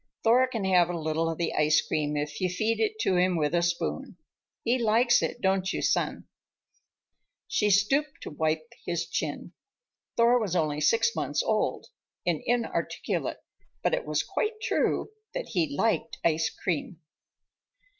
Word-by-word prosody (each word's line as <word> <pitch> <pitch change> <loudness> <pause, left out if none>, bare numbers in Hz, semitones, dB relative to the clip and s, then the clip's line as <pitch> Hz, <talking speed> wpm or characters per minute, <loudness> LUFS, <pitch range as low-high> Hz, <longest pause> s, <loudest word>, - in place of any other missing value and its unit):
Thor 245 +3 +5
can 225 -6 -3
have 180 -2 +4
a 175 - -2
little 160 +1 -1
of 165 - -3
the 170 -1 -1
ice 150 0 +4
cream 150 -1 -1
if 145 +2 -4
you 185 - +1
feed 215 +5 0
it 435 0 0
to 185 - +2
him 180 0 +3
with 150 0 0
a 170 - +3
spoon. 175 +7 -2 0.5
He 245 +2 +2
likes 235 +2 +4
it, - - -3
don't 190 0 +1
you, - - -3
son?" - - 0 1.2
She 210 - +1
stooped 270 +9 +2
to - - -7
wipe 155 +1 -1 0.2
his 170 -1 -2
chin. - - -4 0.6
Thor 240 +1 +5
was 200 -6 -2
only 150 -3 0
six 230 - +3
months - - -1
old - - -1 0.4
and 170 -3 0
inarticulate, 240 -1 -1 0.4
but - - +1
it - - -1
was - - 0
quite 435 0 -2
true 435 - 0 0.2
that - - -4
he 290 -3 -1
liked 225 0 0
ice 165 -1 +2
cream. 170 0 -3
190 Hz, 160 wpm, -28 LUFS, 165-240 Hz, 1.2 s, Thor